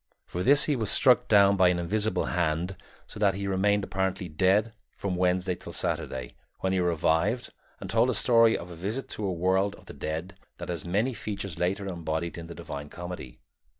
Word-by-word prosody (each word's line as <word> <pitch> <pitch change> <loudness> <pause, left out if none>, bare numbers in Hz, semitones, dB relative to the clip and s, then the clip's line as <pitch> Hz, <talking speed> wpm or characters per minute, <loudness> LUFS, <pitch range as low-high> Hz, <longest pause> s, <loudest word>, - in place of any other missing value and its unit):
For 90 - -5
this 140 +8 +6
he 150 - +1
was 110 -5 -1
struck 125 -1 +5
down 100 -2 +6
by 95 -2 +5
an 90 - +1
invisible 105 +5 0
hand 85 +1 -1 0.3
so - - -9
that 100 -2 +3
he 100 0 -4
remained 100 +1 +1
apparently 95 -1 -2
dead 95 +7 +2 0.2
from 95 -2 -2
Wednesday 90 +1 +1
till - - -9
Saturday, 65 - -2 0.3
when 95 0 0
he 95 - +1
revived 90 +6 +1 0.3
and - - -7
told - - +2
a - - +2
story 115 -2 +4
of 90 +1 -9
a - - -8
visit 105 +10 -3
to - - -6
the 100 - -1
world 95 +3 +1
of - - -18
the - - -10
dead 80 +4 -5 0.2
that - - -7
has 85 -3 -3
many 105 +9 0
features 100 -5 -5
later 95 +3 -1
embodied 85 -2 -3
in 85 -1 -8
the 85 - -9
Divine 75 -4 -7
Comedy. 90 -7 -8
95 Hz, 200 wpm, -27 LUFS, 85-105 Hz, 0.3 s, this